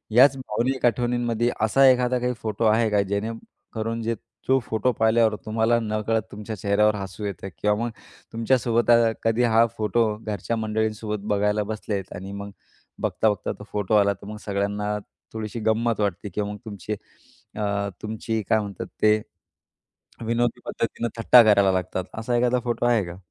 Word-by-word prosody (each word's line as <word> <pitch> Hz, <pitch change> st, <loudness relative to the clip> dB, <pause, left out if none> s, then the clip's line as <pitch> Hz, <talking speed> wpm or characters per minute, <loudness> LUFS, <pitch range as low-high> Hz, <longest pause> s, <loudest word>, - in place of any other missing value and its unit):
याच 135 Hz, +2 st, +7 dB
भावनिक 130 Hz, +2 st, -1 dB
आठवणींमध्ये 120 Hz, 0 st, +1 dB
असा 125 Hz, +5 st, +4 dB
एखादा 125 Hz, 0 st, +2 dB
काही 125 Hz, 0 st, 0 dB
फोटो 110 Hz, +1 st, -1 dB
आहे 110 Hz, +1 st, +4 dB
का 105 Hz, -1 st, +3 dB
जेणेकरून 110 Hz, +2 st, -4 dB
जे 115 Hz, +1 st, -1 dB, 0.3 s
जो 135 Hz, 0 st, +4 dB
फोटो 115 Hz, 0 st, 0 dB
पाहिल्यावर 110 Hz, 0 st, +4 dB
तुम्हाला 110 Hz, +2 st, +2 dB
नकळत 110 Hz, 0 st, 0 dB
तुमच्या 105 Hz, +1 st, -6 dB
चेहऱ्यावर 105 Hz, +2 st, +2 dB
हसू 95 Hz, +1 st, -6 dB
येतं 95 Hz, -1 st, -5 dB
किंवा 105 Hz, +3 st, +1 dB, 0.4 s
तुमच्यासोबत 115 Hz, 0 st, +1 dB
अ, 115 Hz, -1 st, +5 dB
कधी 115 Hz, +2 st, +2 dB
हा 115 Hz, -1 st, +5 dB
फोटो 110 Hz, +2 st, +2 dB
घरच्या 110 Hz, +1 st, -3 dB
मंडळींसोबत 110 Hz, -1 st, -2 dB
बघायला 105 Hz, +1 st, +1 dB
बसलेत 105 Hz, -2 st, -4 dB
आणि 95 Hz, +2 st, -7 dB
मग 100 Hz, 0 st, -6 dB, 0.5 s
बघता-बघता 105 Hz, -3 st, 0 dB
तो -, -, -8 dB
फोटो 105 Hz, 0 st, -1 dB
आला, 100 Hz, -1 st, +4 dB
तर 100 Hz, -, -15 dB
मग 105 Hz, 0 st, -6 dB
सगळ्यांना 105 Hz, +1 st, -1 dB, 0.4 s
थोडीशी 110 Hz, +1 st, -5 dB
गंमत 110 Hz, +1 st, +1 dB
वाटते 100 Hz, 0 st, -1 dB
किंवा 105 Hz, 0 st, -3 dB
मग 105 Hz, -, -6 dB
तुमचे 105 Hz, -1 st, -5 dB, 0.6 s
अ, 100 Hz, -1 st, -1 dB
तुमची 110 Hz, +1 st, -3 dB
काय 110 Hz, -, +4 dB
म्हणतात 100 Hz, -2 st, -5 dB
ते? 110 Hz, 0 st, +4 dB, 1.0 s
विनोदी 120 Hz, +1 st, 0 dB
पद्धतीने 115 Hz, 0 st, -2 dB
थट्टा 120 Hz, +2 st, +8 dB
करायला 100 Hz, -3 st, +5 dB
लागतात, 95 Hz, 0 st, -2 dB, 0.2 s
असा 120 Hz, +2 st, -1 dB
एखादा 125 Hz, +1 st, +2 dB
फोटो 120 Hz, 0 st, -1 dB
आहे 120 Hz, -4 st, +3 dB
का? 85 Hz, +1 st, -8 dB
110 Hz, 155 wpm, -24 LUFS, 105-115 Hz, 1.0 s, थट्टा